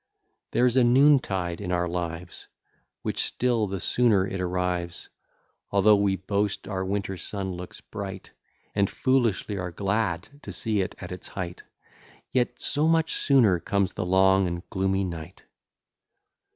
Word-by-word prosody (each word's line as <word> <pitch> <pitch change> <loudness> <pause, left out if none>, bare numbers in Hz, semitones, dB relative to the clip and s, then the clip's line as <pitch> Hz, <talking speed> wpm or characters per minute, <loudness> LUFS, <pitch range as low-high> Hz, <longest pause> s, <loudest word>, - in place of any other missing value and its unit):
There 125 - +2
is 125 +1 +2
a 130 - +6
noontide 120 - +3
in 90 -3 -3
our 90 0 +1
lives, 85 0 -5 0.6
Which - - -2
still 120 -4 0
the 95 0 -4
sooner 105 -1 +3
it 95 -1 -4
arrives, 90 -1 -2 0.6
Although 100 +1 +5
we 100 -1 +2
boast 100 +2 -2
our 95 -2 -2
winter 95 0 -2
sun 95 0 -4
looks 90 0 -8
bright, 95 -2 -7 0.4
And 100 -1 +2
foolishly 115 -6 +1
are 90 -1 -3
glad 100 -2 -1
to - - -7
see 110 -3 +1
it 95 - -4
at 90 - -8
its 90 0 -7
height, 90 -2 -6 0.7
Yet 125 -1 0
so 150 +2 +1
much 165 0 +2
sooner 115 -11 +4
comes 100 +2 0
the - - -3
long 95 +1 +4
and 85 0 -5
gloomy 95 0 +1
night. 85 -1 -7
95 Hz, 150 wpm, -26 LUFS, 90-110 Hz, 0.7 s, a